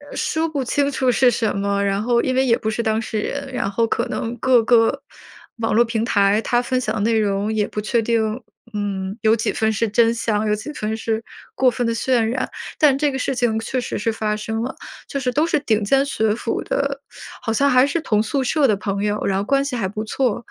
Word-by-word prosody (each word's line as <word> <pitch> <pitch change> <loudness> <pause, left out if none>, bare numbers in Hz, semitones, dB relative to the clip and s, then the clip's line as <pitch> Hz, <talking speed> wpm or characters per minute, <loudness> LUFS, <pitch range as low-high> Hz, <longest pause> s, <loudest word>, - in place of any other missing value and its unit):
说 320 +1 0
不 285 -4 -2
清 285 +3 0
楚 260 -2 +1
是 245 +1 +4
什 220 -2 -1
么， 200 0 0
然 200 0 0
后 235 +1 +2
因 255 - -1
为 265 +1 +3
也 230 -3 +4
不 220 - -2
是 225 +2 -2
当 220 -1 +1
事 220 -1 -3
人， 275 +5 -4
然 225 - -1
后 225 +3 +1
可 235 +3 -1
能 235 -1 -3
各 245 0 +4
个 225 -1 +3 0.6
网 225 -2 -1
络 235 - +5
平 225 -1 -1
台， 200 -1 +3
它 240 0 +2
分 255 +1 -1
享 215 -2 -2
的 215 - -2
内 225 +1 +2
容 205 0 0
也 210 -1 0
不 210 - -5
确 235 +2 +1
定。 225 +1 0 0.3
嗯， 200 0 -3
有 220 -1 +4
几 225 - -1
分 220 0 +1
是 220 +1 0
真 230 +2 +3
相， 225 -2 -1
有 210 - +2
几 215 +8 -7
分 220 -2 -3
是 225 0 -2 0.3
过 260 - +3
分 245 0 -2
地 230 - 0
渲 250 +2 +1
染。 235 +3 -1 0.3
但 295 -3 +5
这 290 0 +1
个 265 - -3
事 270 - -1
情 240 -3 +1
确 250 +3 -2
实 - - -4
是 225 +2 0
发 215 -1 -1
生 220 +1 -3
了， 255 - -4 0.3
就 280 - -3
是 250 -2 -1
都 305 +6 +1
是 305 - +1
顶 220 -6 +1
尖 270 +7 +3
学 220 -6 0
府 230 0 -3
的， 280 0 -2 0.4
好 230 -3 -2
像 280 +5 +3
还 255 +1 +5
是 330 +3 -1
同 215 -8 +1
宿 260 +5 -1
舍 285 +1 +2
的 215 - +3
朋 200 0 -3
友， 210 0 -1
然 195 -1 +1
后 200 - 0
关 275 +4 +2
系 280 -2 -3
还 205 -6 -1
不 210 +3 -4
错。 255 +4 0
然 - - -5
230 Hz, 265 characters per minute, -21 LUFS, 215-255 Hz, 0.6 s, 络